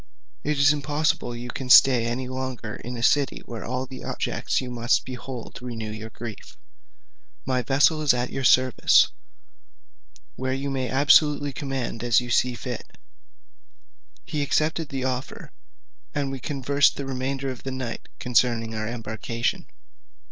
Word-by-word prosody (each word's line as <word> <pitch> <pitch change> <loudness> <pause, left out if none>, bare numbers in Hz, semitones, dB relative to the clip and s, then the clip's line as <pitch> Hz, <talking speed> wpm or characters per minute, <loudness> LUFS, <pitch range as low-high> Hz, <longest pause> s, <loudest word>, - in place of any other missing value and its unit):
It 150 0 0
is 145 +1 +5
impossible 145 -4 -1
you 120 +1 -7
can 130 0 -6
stay 125 -2 +7
any 125 +2 -2
longer 130 -4 -5
in 125 +1 -7
a 115 - -4
city 145 +2 +2
where 115 -3 -7
all 125 +2 -3
the 130 0 -10
objects - - -1
you 130 - -4 0.4
behold 125 -1 -7
must - - -10
renew 115 -3 -5
your 110 +1 -7
grief: 110 -1 -9 0.9
my 130 -1 +1
vessel 140 +5 +3
is 150 - +4
at 125 0 -1
your 135 - -3
service, 130 0 +5 1.3
where 130 0 -2
you 140 +1 -3
may 130 -2 -2
absolutely 145 +1 +4
command 130 -4 -4
as 120 -1 +4
you 125 -1 -5
shall 125 - +3
think 120 - -6
fit." 125 -2 -7 1.3
He 150 - -2
accepted 155 +2 0
the 135 -1 -3
offer, 130 0 -4 0.6
and 140 -2 -1
we 135 - -5
conversed 140 +1 +2
the 140 - -5
remainder 135 +1 -3
of 130 - -9
the 135 - -5
night 130 -3 -5
concerning 120 -2 +1
our 110 -1 -3
embarkation. 115 0 -3
130 Hz, 155 wpm, -25 LUFS, 120-140 Hz, 1.3 s, stay